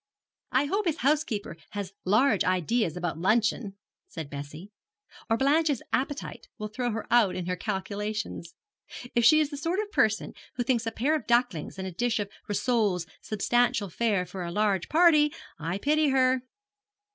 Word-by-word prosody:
'I 260 +3 +3
hope 395 +6 -1
his 325 -1 0
housekeeper 270 - 0 0.2
has 200 -2 -5
large 215 +3 +3
ideas 185 0 0
about 175 -2 -3
luncheon,' 215 +1 +1 0.3
said 160 -4 -7
Bessie, 150 +7 -8 0.6
'or 225 - +3
Blanche's 290 0 +2
appetite 275 +2 -2
will 215 0 -5
throw 245 +3 -2
her 220 -1 -3
out 225 -6 +4
in 180 - -3
her 180 +1 -1
calculations. 210 -1 -4 0.6
If 235 - +2
she 310 +6 +7
is 300 -1 +1
the 285 - -5
sort 335 +6 -1
of 425 -1 -3
person 220 - +1 0.2
who 245 - -1
thinks 235 -2 0
a - - 0
pair 265 +7 0
of 280 -9 -4
ducklings 235 -10 +1
and 190 0 -4
a - - -5
dish 235 +6 0
of 205 -2 -3 0.2
rissoles 205 -5 +1 0.2
substantial 240 0 +1
fare 205 -1 0
for 180 +1 -6
a 170 - -4
large 200 -2 0
party, 310 -2 +5 0.3
I 165 +4 -2
pity 300 +6 +2
her.' 260 -1 +3
220 Hz, 170 wpm, -27 LUFS, 190-265 Hz, 0.6 s, she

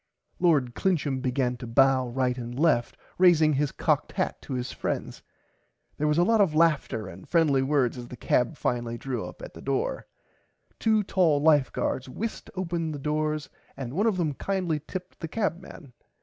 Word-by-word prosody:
Lord 145 -9 +3
Clincham 145 -8 0
began 125 -1 0
to 120 - -8
bow 130 +2 +4
right 125 0 0
and 120 0 -6
left 140 -6 +2 0.2
raising 165 -4 +5
his 145 0 0
cocked - - 0
hat - - -2
to - - -7
his 125 -1 -3
friends. - - -4 0.8
There 150 - +1
was 150 +1 +2
a 175 - +5
lot 225 +3 +4
of 170 -6 +2
laughter 155 - +2
and 95 0 -11
friendly 155 -6 +3
words 135 -3 +1
as 120 - -8
the 125 - -9
cab 125 +6 +1
finally 120 -1 -2
drew 125 -4 -4
up 90 0 -9
at - - -8
the - - -11
front - - -13
door. - - -1 0.7
Two 220 -2 +3
tall 175 -7 +2
life 145 -3 +4
guards 130 0 -2
whisked 220 - -5
open 170 -3 -2
the - - -4
doors 150 +1 -1 0.3
and 130 -2 -5
one 205 +8 +2
of 210 -4 +1
them 160 -5 0
kindly 180 -1 -1
tipped 180 +4 -8
the 165 - -4
cabman. 175 - -4
150 Hz, 185 wpm, -27 LUFS, 125-170 Hz, 0.8 s, raising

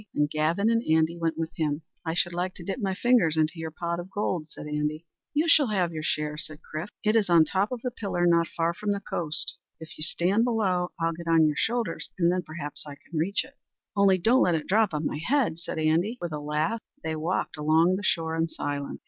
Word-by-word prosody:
And 150 0 +3
Gavin 160 +7 +1
and 230 0 +2
Andy 160 +1 +3
went 165 -1 -1
with 165 0 -2
him. 155 -1 -1 0.2
"I 160 0 -2
should 175 0 +1
like 180 +2 -2
to 175 - -9
dip 195 +7 -4
my 195 -4 -1
fingers 210 -9 +3
into 160 +2 +1
your 160 0 -3
pot 170 +2 -3
of 175 +2 -7
gold," 180 -6 -2
said - - -8
Andy. 150 +2 -2 0.3
"You 305 +3 +1
shall 305 -4 +6
have 185 -6 0
your 155 - -4
share," 150 -1 -1
said 155 +1 -5
Chrif. 155 +5 -5 0.2
"It 215 +1 +2
is 215 -4 +3
on 170 -2 +7
the - - +5
top 195 +4 +1
of 250 -2 -4
a 250 - 0
pillar 195 -6 -1
not 170 -1 +4
far 165 +1 -1
from 205 +3 -1
the 200 - -2
coast. 160 -5 -1 0.2
If 160 0 -10
you'll 155 - +2
stand 190 +6 +2
below, 195 -7 +1
I'll 165 0 +1
get 170 +1 -9
on 165 -1 +5
your 150 -1 +1
shoulders, 235 +7 -1
and 170 -1 +3
then 180 0 0
perhaps 155 -3 -6
I 145 -2 -9
can 155 +2 -6
reach 190 +6 +1
it." - - -19 0.4
"Only 200 -2 +5
don't 230 +9 +4
let 175 - +3
it 155 - -2
drop 215 +1 +3
on 150 -1 -2
my 150 - -2
head," 250 - +1
said 170 - -5
Andy, 165 +9 +1
with 175 - -4
a 150 - -3
laugh. 150 +10 -1 0.2
They 160 0 -2
walked 160 +4 -2
along 160 +4 +3
the 195 - -3
shore 160 -3 0
in 165 0 +1
silence. 145 -2 -4
170 Hz, 240 wpm, -27 LUFS, 155-195 Hz, 0.4 s, on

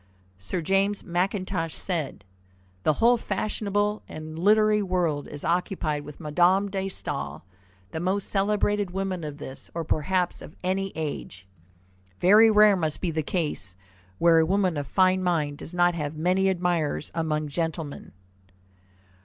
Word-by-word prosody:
Sir 165 - -3
James 195 +3 +1
Mackintosh 180 -2 -1
said: 165 - -3 0.6
"The 155 - +3
whole 235 +9 +4
fashionable 205 0 -1
and 155 +1 -7
literary 210 +2 +4
world 175 -6 -1
is 145 - -7
occupied 165 -4 -1
with 150 0 -10
Madame 180 +6 +2
de 195 -1 -1
Staël, 135 - -5 0.5
the 160 - -4
most 190 +3 0
celebrated 205 0 +1
woman 190 -1 -3
of 150 -1 -6
this, 135 -2 -9
or 165 - -2
perhaps 175 +4 0
of - - -11
any 190 +1 -1
age." 145 -12 -5 0.7
Very 210 +5 +7
rare 210 -1 +6
must 155 -4 -1
be 180 - -1
the 160 0 -1
case 150 - -3 0.4
where 170 -1 +5
a - - +5
woman 190 -2 +1
of 145 -2 -3
fine 185 +4 +3
mind 155 -5 0
does - - -7
not 175 0 +3
have 150 -2 -4
many 185 +4 +2
admirers 175 -5 -1
among 155 -2 -1
gentlemen. 160 -1 -4
175 Hz, 145 wpm, -26 LUFS, 155-195 Hz, 0.7 s, Very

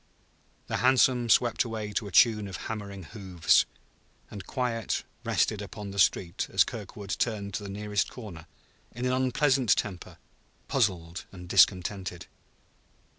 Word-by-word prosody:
The - - -2
hansom 125 -1 +3
swept 120 +2 +4
away 110 -3 -5
to 105 +1 -2
a - - -8
tune 105 0 +5
of 95 - -6
hammering 100 -3 -6
hoofs; 95 -5 +2 0.6
and 100 -3 -8
quiet 115 -4 -2 0.2
rested - - +1
upon 100 -1 -7
the 100 - -5
street 90 -2 +2
as - - +5
Kirkwood 100 -2 -8
turned 100 -4 -2
the 100 +1 -4
nearest 105 0 -1
corner, 95 -10 -10 0.5
in 120 +2 -4
an 125 - +1
unpleasant 130 -2 +3
temper, 95 -4 -5 0.5
puzzled 90 -8 -1
and 90 -2 -10
discontented. 90 -1 +2
105 Hz, 130 wpm, -28 LUFS, 95-120 Hz, 0.6 s, tune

